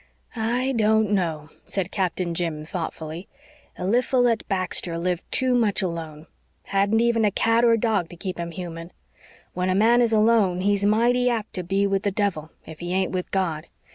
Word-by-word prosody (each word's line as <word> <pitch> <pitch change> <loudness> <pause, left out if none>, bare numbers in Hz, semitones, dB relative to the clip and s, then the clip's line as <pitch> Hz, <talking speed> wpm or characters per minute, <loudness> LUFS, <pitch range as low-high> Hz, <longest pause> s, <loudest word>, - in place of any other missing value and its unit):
"I 240 +4 0
don't 220 -3 +2
know," 160 -6 -1 0.2
said 195 -2 -2
Captain 180 -3 -1
Jim 165 -3 -3
thoughtfully. 165 0 -6 0.5
"Eliphalet 240 +3 +2
Baxter 185 -3 0
lived 175 0 -2
too 260 -1 +2
much 220 -5 +2
alone 160 -3 -5 0.4
hadn't 200 +3 +1
even 235 -1 +2
a 210 - +4
cat 230 +3 +2
or 230 -1 +5
dog 210 -6 0
to - - -10
keep 180 0 -5
him 170 0 -3
human. 170 -1 -8 0.6
When 180 +1 -1
a 185 - +1
man 230 +4 +4
is 235 -2 +2
alone 215 -4 +3
he's 200 +1 +1
mighty 240 +4 +3
apt 225 -3 -3
to 180 - -3
be 195 +3 0
with 195 -1 0
the 200 - 0
devil 195 -7 -2 0.2
if 160 -1 -11
he 175 0 -5
ain't 190 -1 0
with 180 -1 -3
God. 170 -5 -2
195 Hz, 175 wpm, -24 LUFS, 175-225 Hz, 0.6 s, or